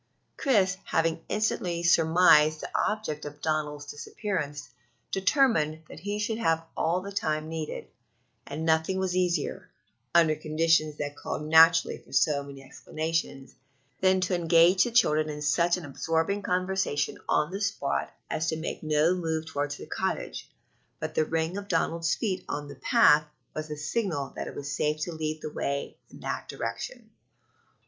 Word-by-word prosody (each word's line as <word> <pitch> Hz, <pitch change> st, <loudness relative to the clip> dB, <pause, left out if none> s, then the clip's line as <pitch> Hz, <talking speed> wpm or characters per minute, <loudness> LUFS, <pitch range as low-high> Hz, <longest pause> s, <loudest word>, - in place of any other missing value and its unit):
Chris, 195 Hz, -9 st, +2 dB
having 165 Hz, 0 st, 0 dB
instantly 180 Hz, -5 st, -1 dB
surmised 160 Hz, -2 st, +5 dB
the -, -, -5 dB
object 210 Hz, -9 st, -1 dB
of 145 Hz, 0 st, -8 dB
Donald's 150 Hz, -1 st, -2 dB
disappearance, 145 Hz, -, -4 dB, 0.4 s
determined 190 Hz, -, +2 dB
that -, -, -11 dB
he 205 Hz, +1 st, -3 dB
should 215 Hz, +2 st, -2 dB
have 165 Hz, -6 st, +1 dB
all 170 Hz, +3 st, +1 dB
the 200 Hz, +2 st, -7 dB
time 155 Hz, -5 st, -1 dB
needed; 160 Hz, -1 st, -5 dB, 0.6 s
and 150 Hz, +3 st, -4 dB
nothing 160 Hz, +3 st, +2 dB
was 190 Hz, -1 st, -1 dB
easier, 180 Hz, -4 st, -1 dB, 0.5 s
under 165 Hz, -2 st, +6 dB
conditions 155 Hz, 0 st, +1 dB
that 145 Hz, 0 st, -4 dB
called 145 Hz, +1 st, -5 dB
naturally 165 Hz, +2 st, +5 dB
for -, -, -21 dB
so 145 Hz, -2 st, +3 dB
many 140 Hz, -1 st, -10 dB
explanations, 155 Hz, -1 st, -4 dB, 0.5 s
than 185 Hz, 0 st, +4 dB
to 185 Hz, 0 st, 0 dB
engage 170 Hz, +1 st, +5 dB
the -, -, -1 dB
children 155 Hz, -10 st, +3 dB
in 150 Hz, 0 st, -5 dB
such 170 Hz, +4 st, +2 dB
an 175 Hz, -, -7 dB
absorbing 165 Hz, +7 st, -1 dB
conversation 185 Hz, -5 st, 0 dB
on 150 Hz, +3 st, +2 dB
the 195 Hz, +2 st, -4 dB
spot 200 Hz, -9 st, -1 dB, 0.2 s
as 160 Hz, -, -2 dB
to 160 Hz, -, 0 dB
make 160 Hz, -, -5 dB
no 155 Hz, +2 st, +3 dB
move 160 Hz, -3 st, -2 dB
toward 145 Hz, -2 st, -2 dB
the 145 Hz, -, -7 dB
cottage; -, -, -3 dB, 0.5 s
but 155 Hz, 0 st, -4 dB
the 155 Hz, -, +2 dB
ring 165 Hz, +3 st, -1 dB
of 200 Hz, 0 st, -6 dB
Donald's 165 Hz, -1 st, +1 dB
feet 190 Hz, -5 st, -2 dB
on 145 Hz, 0 st, -3 dB
the 140 Hz, -, -9 dB
path 150 Hz, +3 st, +5 dB, 0.3 s
was 155 Hz, 0 st, -4 dB
the 150 Hz, -1 st, -6 dB
signal 150 Hz, -, -2 dB
that -, -, -4 dB
it -, -, -8 dB
was 145 Hz, 0 st, -4 dB
safe 150 Hz, +2 st, 0 dB
to 175 Hz, -, -2 dB
lead 155 Hz, -1 st, -3 dB
the 155 Hz, -, -4 dB
way 140 Hz, -1 st, -3 dB
in -, -, -14 dB
that -, -, -4 dB
direction. -, -, -5 dB
160 Hz, 160 wpm, -28 LUFS, 150-185 Hz, 0.6 s, under